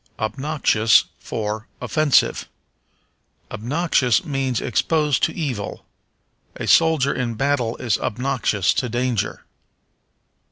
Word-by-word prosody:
Obnoxious 115 -1 +2 0.2
for 110 0 -4
Offensive. 155 -3 +1 1.0
Obnoxious 130 0 +1
means 135 -5 -1
exposed 150 +3 +1
to - - +2
evil. 130 - -4 0.7
A - - -5
soldier 160 -4 +4
in 120 -3 -3
battle 125 -2 0
is 120 -5 0
obnoxious 115 -5 0
to 125 - -1
danger. 120 -2 -2
125 Hz, 90 wpm, -21 LUFS, 110-145 Hz, 1.0 s, soldier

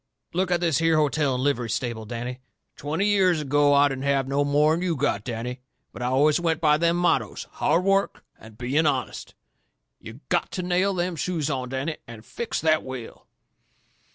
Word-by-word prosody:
Look 185 +1 0
at 175 -1 +1
this 165 -4 +1
here 165 0 +3
hotel 150 -2 +1
and 125 - -2
livery 125 -5 0
stable, 115 -2 -3
Danny. 120 +3 -5 0.4
Twenty 155 +7 -2
years 190 -5 +3
ago 145 0 +2
I 140 0 +5
didn't 135 -1 -4
have 140 -1 +1
no 140 +1 +1
more'n 150 +3 +2
you've 175 -4 -1
got, 100 -4 0
Danny. 125 +2 -5 0.3
But - - -9
I 125 - -1
always 145 +5 +3
went 165 -2 0
by 150 -3 +4
them 170 +1 +2
mottoes 175 0 0
hard 175 - +1
work 195 +1 +1 0.2
and 110 -1 -14
being 140 +7 +1
honest. 135 -3 -3 0.6
You - - -11
GOTTO 185 - -1
nail 185 +2 +1
them 175 0 -1
shoes 160 -3 -2
on, 130 -3 -3
Danny, 135 +4 -3
and 115 -1 -11
fix 235 - -4
that 155 -1 +2
wheel." 130 -3 -9
145 Hz, 180 wpm, -25 LUFS, 130-170 Hz, 0.6 s, I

